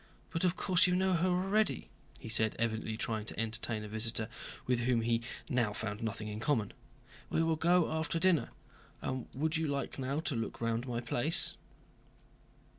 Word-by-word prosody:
But 165 - -1
of 180 -1 +3
course 185 -2 +4
you 180 - +3
know 190 0 +3
her 175 +1 +2
already," 195 +4 +1 0.3
he - - -9
said, 110 -1 +2
evidently 110 -1 -1
trying 110 -2 -2
to - - -5
entertain 110 0 -2
a - - -5
visitor 110 +1 -1 0.4
with 125 -1 +2
whom 120 -1 +2
he 115 0 +1 0.3
now 120 -7 +1
found 105 -1 -4
nothing 110 -1 -3
in 105 0 -4
common. 120 -5 +1 0.6
"We 165 - +2
will 165 0 +2
go 170 +1 +3
after 160 +1 -1
dinner. 175 -2 +3 0.5
And 130 -1 -2
would 155 +4 +1
you 160 -1 0
now 145 - 0
like 140 - -2 0.3
to 150 - -1
look 115 -1 -3
round 115 +2 -1
my 120 -1 -2
place?" 125 - +2
125 Hz, 180 wpm, -33 LUFS, 115-165 Hz, 0.6 s, course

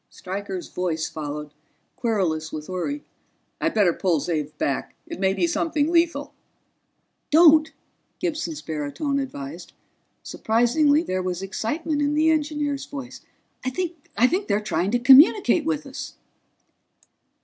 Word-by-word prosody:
Stryker's 190 -1 -6
voice 165 -3 -2
followed, 150 -1 -6 0.4
querulous 175 -9 -1
with 155 0 -6
worry: 235 +11 -3 0.6
"I'd - - 0
better 195 -6 +4
pull 175 -4 +1
Xav 150 -1 -3
back. 140 - -2
It - - -8
may 190 0 +2
be - - +1
something 325 -2 0
lethal." 325 -4 +1 1.0
"Don't," 315 0 +6 0.5
Gibson's 240 - -3
baritone 160 - -2
advised. 170 - -7 0.5
Surprisingly, 285 +7 +2
there 185 - -2
was 185 0 -3
excitement 290 - -2
in 290 +1 +1
the 315 +1 +4
engineer's 295 -3 -1
voice. 275 -4 -8 0.4
"I 255 - 0
think 335 - -1
they're 200 - +2
trying 190 -3 -1
to 245 - +2
communicate 295 - +6
with 305 -2 -1
us." 275 0 -8
245 Hz, 125 wpm, -24 LUFS, -, 1.0 s, Don't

